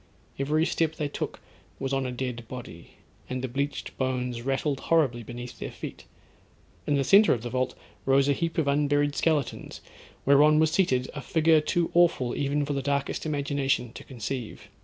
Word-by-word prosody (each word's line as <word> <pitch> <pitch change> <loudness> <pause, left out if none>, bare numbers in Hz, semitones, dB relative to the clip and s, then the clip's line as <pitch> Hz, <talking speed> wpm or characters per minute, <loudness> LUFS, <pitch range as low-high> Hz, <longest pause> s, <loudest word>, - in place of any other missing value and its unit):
Every 155 +4 +2
step 160 -2 0
they 150 - -2
took - - -4 0.4
was 135 0 -3
on 135 -1 0
a - - -3
dead 125 -2 -4
body; 120 -10 -9 0.3
and 130 0 -3
the - - 0
bleached 140 +4 -3
bones 125 -2 -1
rattled 135 +2 -1
horribly 140 -8 +3
beneath 120 +2 -8
their - - -4
feet. - - -8 0.8
In 145 - +2
the 140 - +2
centre 200 +10 +6
of 115 - -7
the 120 - -5
vault 130 0 -1 0.3
rose 135 +1 +3
a 140 - +4
heap 165 +3 -2
of 160 -3 +1
unburied 145 0 +2
skeletons, 150 -6 -1 0.5
whereon 150 +2 +6
was 155 0 +3
seated, 130 -9 +2
a 150 - -5
figure 160 +3 +3
too 170 +2 0
awful 170 -8 +3
even 145 +1 0
for 145 - -2
the 140 - -1
darkest 140 +3 -1
imagination 140 -4 -1
to - - -9
conceive. 125 -2 -6
140 Hz, 180 wpm, -27 LUFS, 125-150 Hz, 0.8 s, centre